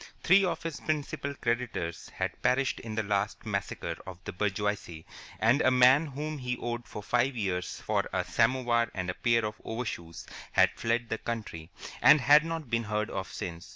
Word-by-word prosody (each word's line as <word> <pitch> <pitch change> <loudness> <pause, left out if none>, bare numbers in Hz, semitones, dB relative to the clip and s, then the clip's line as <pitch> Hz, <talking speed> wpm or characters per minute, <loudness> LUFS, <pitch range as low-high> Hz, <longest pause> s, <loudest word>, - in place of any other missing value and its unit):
Three 195 +3 +6
of 180 - -1
his 165 -3 -4
principal 145 -2 -3
creditors 115 -10 -2
had - - -4
perished 135 +1 +1
in 110 -2 -6
the 110 - 0
last 100 +2 -1
massacre 100 -2 -3
of 95 -2 -7
the - - -6
bourgeoisie, 100 -4 -2 0.3
and 120 +6 +4
a - - +5
man 130 +4 +5
whom 150 +2 -5
he 125 -1 -2
owed 120 0 -4
for 105 - -7
five 125 +4 +1
years 95 -5 -2
for - - -1
a - - 0
samovar 120 0 +2
and 90 -2 -2
a - - -7
pair 115 +2 +2
of 105 0 -5
overshoes 110 -8 -5 0.3
had - - +5
fled 115 0 -1
the 110 - -2
country, 105 -9 -5 0.3
and 150 - +8
had 145 +4 +7
not 165 -3 -4
been 115 0 +1
heard 105 0 -1
of 95 -3 -4
since. 85 -1 -6
115 Hz, 185 wpm, -29 LUFS, 105-130 Hz, 0.3 s, and